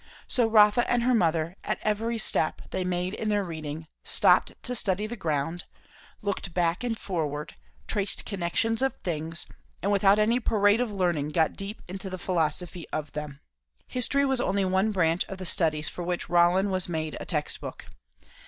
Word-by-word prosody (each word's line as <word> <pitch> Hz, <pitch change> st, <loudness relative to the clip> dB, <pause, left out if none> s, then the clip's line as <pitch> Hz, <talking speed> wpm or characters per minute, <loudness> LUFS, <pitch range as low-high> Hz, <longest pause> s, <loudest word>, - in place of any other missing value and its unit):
So 240 Hz, -4 st, +2 dB
Rotha 215 Hz, +1 st, +5 dB
and 245 Hz, -1 st, +2 dB
her 250 Hz, +1 st, +3 dB
mother, 165 Hz, -4 st, +1 dB
at -, -, -1 dB
every 225 Hz, +2 st, 0 dB
step 160 Hz, -6 st, +1 dB
they 185 Hz, -, -1 dB
made 180 Hz, +1 st, -1 dB
in 215 Hz, 0 st, -2 dB
their 205 Hz, -1 st, +1 dB
reading, 160 Hz, -2 st, -6 dB, 0.2 s
stopped -, -, +4 dB
to 250 Hz, -, -1 dB
study 205 Hz, -3 st, +2 dB
the 230 Hz, +3 st, -5 dB
ground; 165 Hz, -2 st, -2 dB, 0.6 s
looked 200 Hz, -4 st, -3 dB
back 175 Hz, +4 st, +1 dB
and 235 Hz, -2 st, -1 dB
forward, 150 Hz, -7 st, -3 dB, 0.3 s
traced 205 Hz, -2 st, -2 dB
connections 205 Hz, +4 st, -1 dB
of 270 Hz, 0 st, +1 dB
things, 165 Hz, -1 st, -2 dB, 0.4 s
and 200 Hz, -, +1 dB
without 200 Hz, 0 st, +5 dB
any 225 Hz, +3 st, +3 dB
parade 210 Hz, -1 st, +3 dB
of 245 Hz, -3 st, -1 dB
learning 175 Hz, -7 st, 0 dB
got 160 Hz, +1 st, +2 dB
deep 200 Hz, +2 st, -5 dB
into 190 Hz, +2 st, -6 dB
the 185 Hz, -, -5 dB
philosophy 175 Hz, -1 st, -1 dB
of 150 Hz, -1 st, -4 dB
them. 150 Hz, -2 st, -6 dB, 0.5 s
History 280 Hz, +3 st, +2 dB
was 265 Hz, -2 st, +1 dB
only 195 Hz, -2 st, +1 dB
one 190 Hz, +3 st, +2 dB
branch 170 Hz, -3 st, +2 dB
of 195 Hz, -, -7 dB
the 185 Hz, -, -7 dB
studies 155 Hz, -3 st, +2 dB
for -, -, -6 dB
which 175 Hz, -1 st, -3 dB
Rollin 175 Hz, +3 st, +4 dB
was 185 Hz, -1 st, 0 dB
made 160 Hz, -2 st, -3 dB
a -, -, -6 dB
text 150 Hz, -4 st, -1 dB
book. -, -, -7 dB
185 Hz, 180 wpm, -27 LUFS, 165-215 Hz, 0.6 s, Rotha